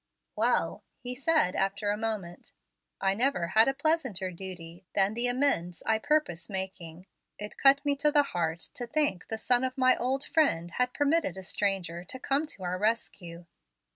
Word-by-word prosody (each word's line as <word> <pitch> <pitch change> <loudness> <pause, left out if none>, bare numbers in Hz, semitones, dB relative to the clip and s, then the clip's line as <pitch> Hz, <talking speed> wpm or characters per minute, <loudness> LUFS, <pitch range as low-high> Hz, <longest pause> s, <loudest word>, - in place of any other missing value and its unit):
"Well," - - +1
he 250 0 -5
said, 275 - +2
after 200 +2 0
a - - 0
moment, 210 -6 -5 0.5
"I 195 0 +2
never 210 -6 +1
had 220 +4 +5
a 270 - +2
pleasanter 265 - 0
duty 175 -1 -8
than 195 +1 +3
the 240 +2 +1
amends 245 -10 0
I 220 -1 +2
purpose 285 - 0
making. 185 -3 -6 0.3
It 210 0 -7
cut 280 +1 +4
me 285 -1 +2
to 300 +1 +2
the 290 -1 +5
heart 170 - -2
to 245 - -5
think 295 -11 0
the 220 - -3
son 245 +3 +2
of 255 0 -2
my 255 -1 +5
old 265 +3 -1
friend 175 - +1
had 250 +6 -1
permitted 290 - +1
a 190 - -7
stranger 180 -3 -1
to 260 - -6
come 280 +4 0
to 200 -10 -9
our 180 0 -2
rescue." 185 -6 -2
215 Hz, 175 wpm, -29 LUFS, 180-270 Hz, 0.5 s, had